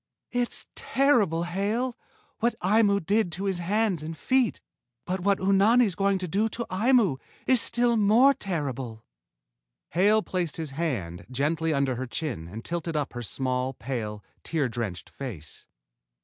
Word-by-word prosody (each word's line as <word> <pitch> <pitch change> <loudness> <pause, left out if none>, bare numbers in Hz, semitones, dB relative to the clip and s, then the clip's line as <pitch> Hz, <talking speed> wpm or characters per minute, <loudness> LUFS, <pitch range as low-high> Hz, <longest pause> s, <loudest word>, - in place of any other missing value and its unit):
"It's 245 -1 -1
terrible, 230 - +2
Hale, 210 +8 -1 0.4
what 235 0 +1
Aimu 200 -1 +3
did 205 -1 +2
to 190 - -4
his 190 -3 -1
hands 195 -1 0
and 160 +1 -6
feet, 255 - +1 0.5
but 185 +1 -2
what 200 +2 +2
Unani's 200 +3 +4
going 195 +2 +1
to 185 -1 -4
do 205 +6 +1
to 235 +2 -4
Aimu 210 - +3 0.3
is 255 -3 +5
still 240 0 +2
more 225 +7 +5
terrible." 135 - -4 0.8
Hale 205 +5 +3
placed 175 -5 -2
his 160 -4 -4
hand 120 - -3
gently 155 +5 0
under 140 -4 +1
her 130 +1 -4
chin 120 - -4
and 110 +6 -8
tilted 170 -1 -3
up 145 -2 -1
her 120 - -5
small, 130 +2 -2
pale, 110 -5 -4 0.2
tear 155 -5 0
drenched 115 -7 -4
face. 105 - -8
175 Hz, 150 wpm, -27 LUFS, 135-215 Hz, 0.8 s, is